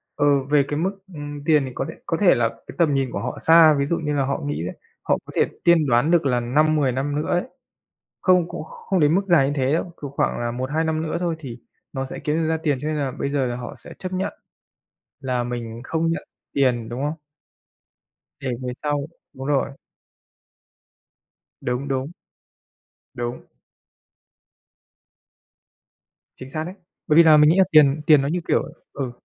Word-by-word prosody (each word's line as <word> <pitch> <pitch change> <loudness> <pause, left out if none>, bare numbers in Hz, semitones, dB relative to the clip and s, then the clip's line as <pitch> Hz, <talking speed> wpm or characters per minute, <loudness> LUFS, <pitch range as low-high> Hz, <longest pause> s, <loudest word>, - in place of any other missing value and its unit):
ờ, 145 - +1 0.2
về 145 -1 +4
cái 145 - -2
mức, 185 +4 +1 0.2
ừm, 145 -1 -7
tiền 150 -4 +4
thì 130 - -6
có - - -2
thể - - -8
có 165 -1 -1
thể 185 -8 +5
là 115 -1 +2
cái 115 0 -14
tầm 160 -4 +3
nhìn 135 -2 0
của 100 - -3
họ - - -4
xa. 160 -1 +7
Ví 140 - +1
dụ 170 +3 0
như 150 -2 -2
là 140 -2 +1
họ 140 +1 -2
nghĩ 145 - -2
đấy, 90 - -5 0.3
họ - - +2
có - - -10
thể - - +4 0.2
tiên 170 -3 +5
đoán 125 +6 +3
được 170 -4 +3
là 125 -2 +2
5-10 145 +2 +2
năm 140 +3 -2
nữa 150 - -2
ấy, 175 - +2 0.8
không 180 -2 +3
cũng - - -6
kh - - -16
không 190 -3 -2
đến 150 +2 +4
mức 195 - +3
dài 155 -6 +5
như 145 - -1
thế 135 +1 +1
đâu, 165 - +1 0.2
kiểu, 140 - -4
khoảng 140 - -1
là 120 0 -1
1-2 130 +6 -2
năm 160 0 -1
nữa 160 - -2
thôi 175 -2 0
thì 125 -6 -8 0.3
nó 135 -1 -3
sẽ - - -7
kiếm 150 +1 -1
được 160 -1 0
ra 160 - +1
tiền 145 -5 +1
cho 150 - -2
nên 155 - -1
là 140 -3 -1
bây 140 - -3
giờ 140 -2 0
là 120 -1 -3
họ 120 -1 -7
sẽ - - -12
chấp 185 0 -6
nhận 185 +1 -2 0.9
là 125 -3 -1
mình 120 -1 -5
không 165 +3 -1
nhận 165 - -2 0.3
tiền, 125 -5 +1
đúng 125 +3 -4
không? 150 - 0 1.3
Để - - -4
về 125 -1 -3
sau 145 -1 0 0.3
đúng 135 - -8
rồi. 140 -1 +1 1.9
Đúng, 125 +3 -2
đúng. 135 +3 -2 1.0
Đúng. 120 0 -4 3.0
Chính 130 - -9
xác 155 +3 -3
đấy. 180 - -6 0.3
Bởi 150 - +3
vì 170 - +9
là 155 -2 +7
mình 150 0 +6
nghĩ 170 - +3
là 190 - +7
tiền 150 -1 +5
tiền 150 -3 +7
nó 140 - -1
như, 175 +4 0
kiểu - - +3 0.3
ừ. 135 -3 -3
145 Hz, 205 wpm, -23 LUFS, 130-160 Hz, 3.0 s, vì